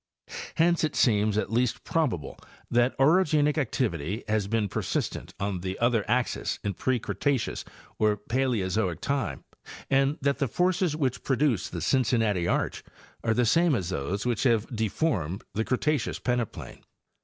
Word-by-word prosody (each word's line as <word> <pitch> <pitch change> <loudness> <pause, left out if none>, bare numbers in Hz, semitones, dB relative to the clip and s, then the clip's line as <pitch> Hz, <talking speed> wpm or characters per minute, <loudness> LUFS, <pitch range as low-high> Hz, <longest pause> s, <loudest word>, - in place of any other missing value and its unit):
Hence 170 0 +3
it 155 - 0
eems 105 -3 +3
at 110 - -1
least 120 0 0
probable 125 - -1 0.3
that 120 +2 +2
orogenic 150 0 +4
activity 105 - -1
has 105 -2 0
been 110 -1 0
persistent, - - -3
the 95 -1 -3
other 120 -2 +2
axes 125 +1 0
in 100 - -1
pre 130 +7 0
Cretaceous 115 +4 -1 0.4
or 105 -1 +3
Paleozoic 105 - 0
time, 140 -1 -2 0.5
and 135 +2 +3
that 140 +1 0
he 140 - +1
forces 180 - +1
which 135 -5 -1
produced 135 -5 +1
the 85 - -4
Cincinnati 110 - +2
arch - - -1 0.4
are 115 -1 +1
the 125 - +3
same 165 +5 +4
as 95 -6 -2
those 95 - -2
which 120 -2 0
have 115 -2 +1
deformed 105 - -1
the 110 - 0
Cretaceous 135 +2 0
peneplain. 125 -2 -3
120 Hz, 145 wpm, -27 LUFS, 105-140 Hz, 0.5 s, orogenic